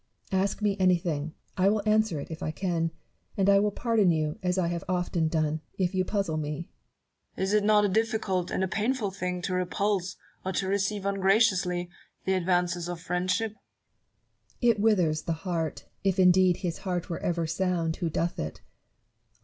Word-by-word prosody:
Barrow. 190 -1 +2
Ask 200 +2 -2
me 205 -1 +2
anything: 170 -4 +1 0.2
I 190 +1 +4
will 210 0 +1
answer 215 -6 +2
it, 140 - -7
if 160 +2 -7
I - - -2
can; 165 0 -1 0.5
and 195 -1 +2
I 200 0 +6
will 210 +1 +2
pardon 220 -2 +2
you, 155 -2 0
as 180 0 0
I 180 -2 +2
have 170 -1 -3
often 175 -2 0
done, 155 -1 0 0.2
if 185 -1 0
you 185 0 +2
puzzle 195 -5 -1
me. 150 +2 -4 0.7
Newton. - - -1
Is 190 +2 0
it 210 -1 +4
not 210 0 +5
a - - +4
difficult 215 -3 0
and 190 - -1
a - - +1
painful 215 +2 -1
thing 180 -2 -3
to 185 - -1
repulse, 185 +1 0 0.3
or 190 - -2
to 190 - -1
receive 200 +1 0
ungraciously, 190 -2 +2 0.4
the 190 - +2
advances 175 -1 +1
of 175 -1 -4
friend 180 +2 -2
ship? 225 +3 +1 1.1
Barrow. 240 -1 +5
It 215 - -3
withers 180 -8 +3
the 165 - -2
heart, 165 -2 -3 0.2
if 195 -1 +1
indeed 185 -1 +5
his 175 -3 -3
heart 180 -3 -3
were 170 - -4
ever 170 -1 -1
sound 170 -1 -1
who 170 -3 -1
doth 170 +2 -1
it. 75 0 -5
185 Hz, 190 wpm, -28 LUFS, 170-200 Hz, 1.1 s, I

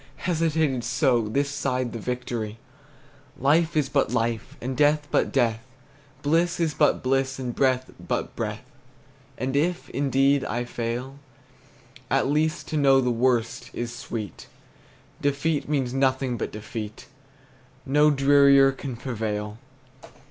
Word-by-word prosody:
Hesitated 160 -4 0
so 120 -1 +2
This 140 +5 0
side 130 -4 -2
the 115 - -5
victory! 115 -2 -4 0.8
Life 155 +5 +2
is 145 -3 +2
but 140 -3 +1
life, 115 -2 -2
and 130 +2 -4
death 150 +1 +3
but - - +2
death! 115 -3 +1 0.6
Bliss 165 +4 +2
is 165 -3 +1
but - - +2
bliss, 135 0 0
and 125 -2 -4
breath 130 -1 +1 0.2
but - - -2
breath! - - -4 0.7
And 130 +3 -2
if, 175 +5 0
indeed, 135 +1 +2
I 120 +1 -2
fail, 120 +3 -4 0.9
At - - +2
least 155 +3 0
to 155 - -1
know 135 -2 +5
the 125 -2 +1
worst 120 0 0
is 120 0 -4
sweet. 115 - -6 0.7
Defeat 145 +2 0
means 135 -5 0
nothing 130 -1 +1
but - - -4
defeat, 105 0 -7 0.8
No 150 +3 +4
drearier 140 -1 +5
can 135 -1 -6
prevail! 110 -4 -4
135 Hz, 130 wpm, -25 LUFS, 120-145 Hz, 0.9 s, know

